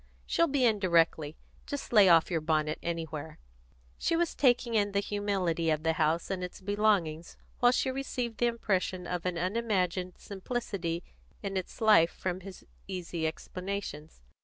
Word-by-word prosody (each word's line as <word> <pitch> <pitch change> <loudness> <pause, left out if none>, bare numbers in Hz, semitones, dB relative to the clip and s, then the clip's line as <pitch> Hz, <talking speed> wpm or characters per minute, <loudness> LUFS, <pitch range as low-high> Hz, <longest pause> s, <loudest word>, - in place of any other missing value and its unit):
She'll 335 - +2
be 275 -3 +2
in 220 -3 +3
directly. 165 -4 +2 0.3
Just 285 -3 -5
lay 205 -4 +7
off 165 +1 +5
your 165 -2 0
bonnet 155 -1 0
anywhere." 160 -2 -4 0.6
She 335 - +1
was 340 0 +1
taking 245 -3 +2
in 205 -2 +2
the 200 - +2
humility 195 -5 -1
of 155 0 0
the 160 0 +2
house 160 +3 0
and 185 -1 -2
its 180 - -6
belongings 190 -5 0 0.2
while 245 0 +6
she 260 +1 +1
received 250 -4 -4
the 240 - +3
impression 190 -6 -1
of 180 0 -3
an 180 -2 -2
unimagined 185 -2 -1
simplicity 190 -5 -4 0.4
in 195 -1 -3
its 185 +4 -4
life 190 -7 +6
from 185 0 -4
his 190 0 -11 0.2
easy 170 -3 -3
explanations. 180 - -6
185 Hz, 160 wpm, -30 LUFS, 165-215 Hz, 0.6 s, lay